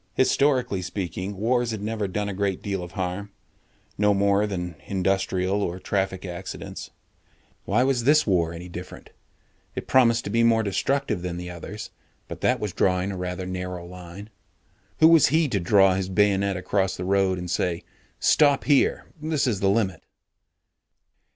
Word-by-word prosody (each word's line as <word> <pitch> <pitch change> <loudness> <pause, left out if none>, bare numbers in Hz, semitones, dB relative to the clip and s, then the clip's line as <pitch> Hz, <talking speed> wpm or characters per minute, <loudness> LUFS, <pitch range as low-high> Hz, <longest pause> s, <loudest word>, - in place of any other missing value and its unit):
Historically 130 -7 +2
speaking, 95 +1 -4
wars 120 +3 +1
had 110 -2 -3
never 105 0 -2
done 105 +2 -2
a 100 - -3
great 100 -1 -2
deal 100 -2 -2
of 90 +1 -8
harm 95 +1 -3 0.7
no 105 -1 +4
more 100 0 +3
harm 105 0 0
than 90 -3 -4
industrial 95 0 0
or 90 -2 -2
traffic 95 -1 -2
accidents. 90 0 -7 0.8
Why 110 +5 +2
was 130 -3 +1
this 150 +4 +4
war 85 -5 +1
any 85 +1 -8
different? 90 +1 -9 0.6
It - - -4
promised 115 -3 +4
to 100 - -5
be 115 +2 +2
more 115 -1 +4
destructive 135 +1 -1
than 90 -1 -4
the 90 0 -6
others, 100 +5 -8 0.4
but - - -8
that - - +2
was 105 -4 -3
drawing 90 +1 +1
a - - -5
rather 90 0 -4
narrow 90 -1 -5
line. 90 +4 -10 0.7
Who 160 - +9
was 165 -4 +6
he 155 +3 +2
to 105 -5 0
draw 95 +1 +4
his 95 0 -2
bayonet 100 -1 +2
across 95 +1 -1
the 90 - -4
road 95 -1 +2
and 90 0 -5
say, 85 -1 -1 0.4
"Stop 145 -3 +4
here. 145 -2 +2 0.2
This 155 -2 0
is 115 -7 0
the 95 - +2
limit." 95 -5 0
100 Hz, 170 wpm, -25 LUFS, 90-110 Hz, 0.8 s, Who